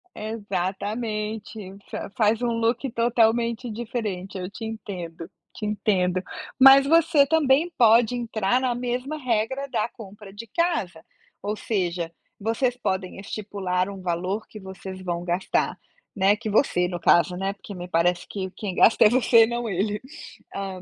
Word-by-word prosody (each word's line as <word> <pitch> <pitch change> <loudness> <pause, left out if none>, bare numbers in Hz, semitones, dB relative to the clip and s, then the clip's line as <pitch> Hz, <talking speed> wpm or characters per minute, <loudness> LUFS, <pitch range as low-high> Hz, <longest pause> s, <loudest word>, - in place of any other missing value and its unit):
Exatamente, 210 0 -4
fa-faz 215 +2 0
um 240 - +1
look 230 +3 0
totalmente 235 +1 +1
diferente. 210 -5 -4
Eu 180 0 -5
te 225 +3 -8
entendo, 180 -6 -7 0.3
te 215 - -5
entendo. 185 -3 +1 0.4
Mas 270 +1 +9
você 320 -1 +5
também 310 +2 +3
pode 230 0 +5
entrar 230 -1 0
na 255 -2 0
mesma 250 +4 -3
regra 255 +1 -1
da 230 -4 0
compra 205 -2 -12
de 225 +3 -9
casa, 220 - -1 0.4
ou 210 +1 -2
seja, 175 -6 -2 0.3
vocês 230 +4 0
podem 190 -6 -3
estipular 195 -2 -2
um 195 -1 -8
valor 185 +4 -2
que 215 - -10
vocês 190 -1 -9
vão 175 -2 -3
gastar, 175 +1 -1 0.4
né, 200 0 +4
que 215 +1 -5
você 200 -5 +2
no 175 -1 -4
caso, 175 +1 +3
né, 195 +1 -2
porque 200 0 -11
me 180 -1 -7
parece 175 +1 +1
que 190 -2 -5
quem 195 -1 -5
gasta 220 - +6
é - - +8
você 235 -1 +5
e - - -6
não 235 -1 -3
ele, 205 +3 -1 0.5
hã 190 -2 -5
210 Hz, 150 wpm, -24 LUFS, 190-235 Hz, 0.5 s, Mas